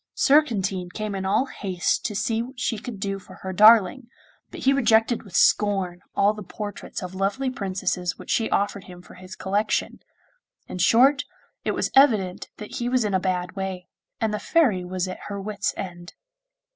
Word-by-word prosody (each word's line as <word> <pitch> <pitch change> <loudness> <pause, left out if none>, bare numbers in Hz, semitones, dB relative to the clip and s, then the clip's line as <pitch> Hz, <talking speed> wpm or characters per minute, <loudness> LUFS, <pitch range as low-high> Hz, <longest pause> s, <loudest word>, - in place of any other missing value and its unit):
Surcantine 200 -11 +2
came 215 +2 -4
in 190 -1 -3
all 215 +7 +2
haste 190 -9 -2
to 210 - -6
see 225 +3 0
what 250 +2 -8
she 225 -3 -1
could 220 -2 -8
do 195 0 -3
for - - -14
her 190 0 -4
darling, 215 +4 +6 0.4
but - - -9
he 270 - +4
rejected 230 -3 +3
with 195 -5 -12
scorn 195 -4 +2
all 205 +1 +3
the 210 - -9
portraits 205 -1 -7
of 180 0 -6
lovely 200 +8 -1
princesses 185 -5 -2
which - - -7
she 225 - +1
offered 200 -1 -1
him 180 -1 -12
for - - -15
his 185 0 -11
collection. 205 +3 -1 0.7
In 180 - -7
short, 265 +10 +5 0.4
it - - -1
was - - -1
evident 215 -10 +3
that 210 - -7
he 240 0 -2
was 250 -3 +1
in 205 - -1
a 190 - +3
bad 180 -2 -2
way, 190 -2 -5 0.3
and 220 -1 0
the 210 - -2
Fairy 245 - +2
was 185 +1 -3
at 185 - -6
her 200 -1 -5
wits' 205 0 -2
end. 175 -2 -7
200 Hz, 185 wpm, -24 LUFS, 185-225 Hz, 0.7 s, darling